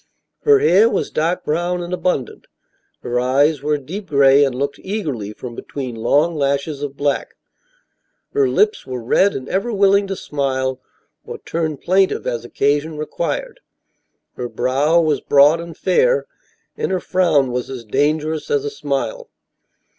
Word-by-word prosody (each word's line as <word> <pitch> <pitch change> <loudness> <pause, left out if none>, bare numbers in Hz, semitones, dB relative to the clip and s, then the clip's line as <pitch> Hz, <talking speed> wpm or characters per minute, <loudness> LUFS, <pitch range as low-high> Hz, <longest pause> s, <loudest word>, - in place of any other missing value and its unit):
Her 435 -1 +7
hair 215 - +5
was - - -2
dark 170 +4 -1
brown 175 +3 -1
and 175 +1 -6
abundant; 180 -9 -2 0.6
her 120 0 -1
eyes 140 +4 +2
were 150 +1 +1
a - - -4
deep 185 +9 -7
gray 140 -1 +5
and 135 -3 0
looked 140 +2 -3
eagerly 150 - -4
from 120 +3 -8
between 130 +1 -6
long 145 +9 +1
lashes 140 0 -1
of 140 -1 -5
black; 145 -1 -1 1.0
her 415 -2 +2
lips 425 0 +1
were 125 -2 -5
red 195 - +3
and 130 - -5
ever 195 +6 -1
willing 200 -1 +3
to 195 - -3
smile 130 -4 -2 0.4
or - - -7
turn 160 -3 -3
plaintive 190 +5 +1
as 120 -2 -2
occasion 145 +5 0
required; 170 - -4 0.8
her 125 -1 -4
brow 140 +8 +2
was 155 -3 +1
broad 145 +3 +5
and 170 -1 -8
fair, - - +2 0.5
and - - -2
her 185 - 0
frown 160 -10 +2
was 125 0 -3
as 125 -3 -7
dangerous 150 +6 -1
as 435 -1 +1
a 435 - -3
smile. - - -3
150 Hz, 155 wpm, -19 LUFS, 135-185 Hz, 1.0 s, Her